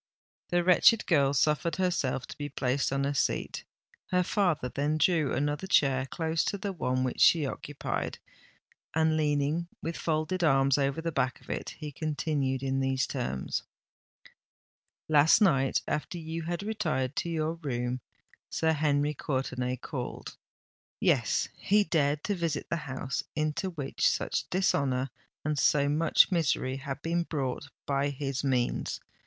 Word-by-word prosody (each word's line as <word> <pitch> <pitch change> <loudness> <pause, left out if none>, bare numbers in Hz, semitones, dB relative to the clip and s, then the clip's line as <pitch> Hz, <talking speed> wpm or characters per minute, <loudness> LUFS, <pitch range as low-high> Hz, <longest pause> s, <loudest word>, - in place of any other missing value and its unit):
The 175 0 +2
wretched 185 +5 +5
girl 140 -5 +3
suffered 155 +4 +2
herself 160 -9 0
to - - -10
be 145 0 -3
placed 135 0 0
on 135 0 0
a 140 - 0
seat: 140 - -1 0.4
her 180 0 +2
father 175 - +1
then 145 +4 0
drew 155 -2 +2
another 145 +6 -1
chair 135 -7 +3
close 160 +2 -1
to 200 - -1
the 200 0 -4
one 130 -6 0
which 130 - -2
she 160 -4 +6
occupied—and, 155 +3 -4
leaning 150 +2 +1
with 165 0 -4
folded 165 +3 -1
arms 135 -2 +4
over 140 +3 0
the 165 0 -2
back 130 -4 0
of - - -9
it, - - -4
he 150 -2 -6
continued 145 -3 -1
in 135 0 0
these 135 -1 +1
terms:—— 65 0 -3 1.5
"Last 155 0 +6
night—after 150 - +1
you 165 0 -5
had 170 +3 -3
retired 150 -12 -1
to 170 - -1
your 160 -1 -1
room—Sir 125 +4 -3
Henry 145 -1 +1
Courtenay 130 -3 -2
called. 125 0 -6 0.6
Yes—he 205 +1 +2
dared 150 -5 +1
to 205 - 0
visit 165 -5 -2
the 170 - +1
house 135 0 -3
into 155 +4 -1
which 150 -6 0
such - - -2
dishonour 135 -8 +1 0.3
and 150 -2 0
so 145 0 +3
much 155 +6 +4
misery 135 -6 +1
had 135 0 -6
been 170 +1 +1
brought 145 -4 -3 0.2
by 140 0 +1
his 140 -1 -3
means. 125 -3 0
145 Hz, 140 wpm, -29 LUFS, 135-165 Hz, 1.5 s, she